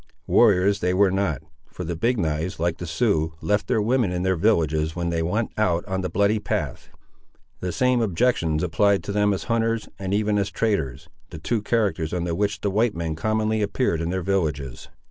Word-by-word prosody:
Warriors 100 +3 +4
they 90 0 0
were 100 0 +4
not, 95 -4 -1 0.2
for 90 - -7
the 85 0 -3
Big 120 +9 +1
knives, 80 +1 -2
like 85 0 -1
the 90 - -5
Siouxes, 80 -3 0
left 105 +3 0
their - - +1
women 120 -3 +1
in 90 0 -2
their 95 0 +2
villages 80 -5 +1
when 85 -1 -2
they 85 -1 -1
went 105 +8 -1
out 90 -5 +1
on 95 -1 -2
the 90 - -3
bloody 100 +2 +2
path. 105 - -3 0.7
The 90 - -3
same 125 +5 +2
objections 85 -7 +1
applied 100 +4 +2
to - - -4
them 105 0 +2
as 95 - -2
hunters, 115 -1 -1
and 95 -1 -4
even 105 0 +1
as 100 0 -1
traders, 100 - -1 0.2
the - - -8
two 110 +8 -1
characters 100 -7 0
under 85 -1 -2
which 100 +2 -1
the 100 - 0
white 110 +2 +1
men 85 -1 -2
commonly 110 +5 0
appeared 100 -4 0
in 85 - -2
their 95 0 -2
villages. 75 -9 -2
95 Hz, 200 wpm, -24 LUFS, 85-105 Hz, 0.7 s, Warriors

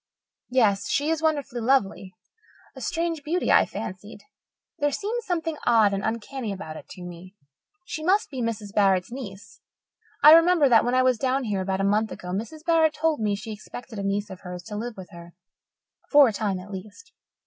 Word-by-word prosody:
Yes, 220 -6 +2
she 290 +3 +1
is 325 -1 -1
wonderfully 285 -6 -1
lovely 205 -6 0 0.6
a - - -10
strange 330 -2 -2
beauty, 345 +5 0
I - - +5
fancied. 205 +3 -7 0.6
There 290 0 +2
seemed 435 - -3
something 330 -4 -2
odd 220 -4 +4
and 195 +1 -2
uncanny 230 +1 -3
about 185 -5 -7
it - - -11
to 180 - -10
me. 180 +2 -10 0.5
She 315 -2 -6
must 380 +3 +2
be 260 -3 -4
Mrs. 215 -3 -4
Barrett's 195 -1 +2
niece. 205 -6 -9 0.6
I 300 - +11
remember 330 -2 +6
that 235 -3 +5
when 245 +1 0
I 255 - +4
was 255 -3 +2
down 265 0 0
here 205 -5 -1
about 190 0 -1
a - - 0
month 210 +2 +1
ago 180 - -8
Mrs. 230 - -5
Barrett 325 -2 +3
told 315 0 0
me 210 -2 0
she 215 +2 -7
expected 220 +1 -9
a - - -3
niece 200 +1 -2
of 185 - -9
hers 180 -1 -8
to 215 -1 -8
live 225 +1 -5
with 185 -1 -10
her 170 0 -12 0.7
for 290 -2 +7
a 225 - -1
time 200 -2 -1
at 195 +3 -11
least. 210 - -10
225 Hz, 195 wpm, -25 LUFS, 195-295 Hz, 0.7 s, I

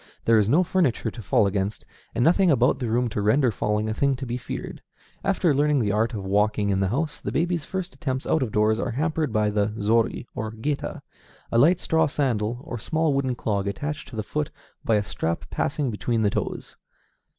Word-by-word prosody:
There 115 -1 +5
is 105 0 +2
no 165 +9 +5
furniture 165 - +1
to 115 - -9
fall 105 - +3
against, 100 +1 -2 0.3
and 120 - +2
nothing 180 +5 +4
about 130 -2 +3
the 125 -4 -2
room 120 +2 +1
to 105 - -2
render 120 +5 +3
falling 105 +1 -1
a 110 - -1
thing 140 +4 +1
to 130 +1 -6
be 120 -1 -3
feared. 125 - -6 0.4
After 185 -5 +2
learning 145 +1 +2
the 105 -4 +1
art 110 +3 +1
of 100 -2 -5
walking 105 +1 +1
in 95 - +1
the 95 - +2
house, 145 - -2
the - - -3
baby's 170 -2 0
first 190 -2 -4
attempts 130 -5 -3
out 160 - +1
of 125 -5 -1
doors 110 +1 +2
are - - -1
hampered 155 +2 -1
by 105 -1 +1
the 105 +1 0
zori 110 +3 +1
or 110 0 -4
géta, 140 +6 -3 0.5
a 115 - +3
light 170 +7 +5
straw 160 -1 +2
sandal 120 -5 -1
or 120 -6 -6
small 160 +5 0
wooden 130 -2 0
clog 100 -4 -1
attached 145 +9 -4
to 125 - -10
the 110 - -2
foot 150 +7 -2 0.3
by 115 - +2
a 105 - +2
strap 85 -3 -3
passing 140 -5 -1
between 115 +1 -1
the 100 - +2
toes. - - -4
120 Hz, 215 wpm, -25 LUFS, 105-145 Hz, 0.5 s, There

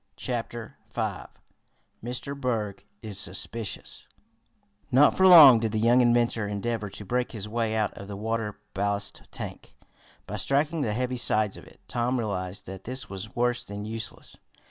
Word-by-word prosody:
Chapter 120 -2 -5
Five - - -3 0.8
Mr. 125 +4 -4
Berg 115 -8 -2 0.2
is 105 -3 -3
Suspicious 100 +3 -4 0.8
Not 140 +3 +6
for 190 - +5
long 150 -10 +10
did 110 -1 -1
the 110 - +1
young 120 +3 +5
inventor 120 -3 +2
endeavor 105 +1 -2
to 100 +2 -8
break 125 +5 -1
his 105 -2 -4
way 115 0 -1
out 110 -1 0
of 100 - -10
the 100 -1 -6
water 110 0 -2 0.2
ballast 100 +1 -1
tank - - -8 0.5
by 105 - -5
striking 145 - +1
the 110 -6 0
heavy 125 +2 -1
sides 110 -4 +3
of - - -12
it. - - -19
Tom 120 +2 0
realized 95 -5 -3
that 95 0 -9
this 130 -1 -4
was 95 +2 -7
worse 120 0 +1
than 100 -2 -7
useless. 110 0 -6
115 Hz, 160 wpm, -27 LUFS, 105-125 Hz, 0.8 s, long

